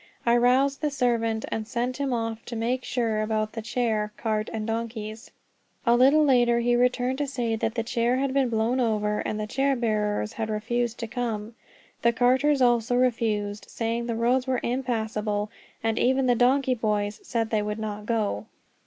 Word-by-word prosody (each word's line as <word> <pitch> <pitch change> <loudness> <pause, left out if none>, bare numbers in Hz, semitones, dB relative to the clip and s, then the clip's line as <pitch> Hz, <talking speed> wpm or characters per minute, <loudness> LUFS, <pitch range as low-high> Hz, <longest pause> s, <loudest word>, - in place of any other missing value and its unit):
I 235 0 +4
roused 260 +3 +3
the 300 - +1
servant, 230 -5 0
and 220 -1 -3
sent 245 +2 -2
him 280 -2 -1
off 225 -1 -2
to 240 - -6
make 245 +3 -1
sure 225 -3 -1
about 215 0 -1
the 225 - -4
chair, 220 -2 -1
cart, 215 -1 -1
and 220 -1 -3
donkeys. 225 -1 -4 0.6
A 235 0 +5
little 275 +5 +5
later 240 -3 +4
he 240 0 +2
returned 250 +2 +1
to 290 - 0
say 240 -4 -1
that 220 +1 -2
the 230 - 0
chair 235 +1 +1
had 265 0 0
been 270 -2 +2
blown 230 +3 +1
over, 210 -3 0
and 215 - -3
the 215 - -2
chair 270 +5 +1
bearers 215 -2 -1
had 220 -1 -3
refused 235 +2 -1
to 230 - -3
come. 225 -2 -3 0.5
The 235 0 +3
carters 260 +4 +3
also 240 0 +3
refused, 220 -5 0
saying 230 +1 -2
the 230 - -1
roads 250 +3 +1
were 255 -2 +1
impassable; 220 -4 -2 0.3
and 225 0 0
even 260 +1 +2
the 250 - +4
donkey 255 +2 +3
boys 210 -3 -1
said 230 -2 -2
they 215 -2 +2
would 210 +1 -3
not 210 -1 -5
go. 220 -2 -1
235 Hz, 185 wpm, -26 LUFS, 220-250 Hz, 0.6 s, A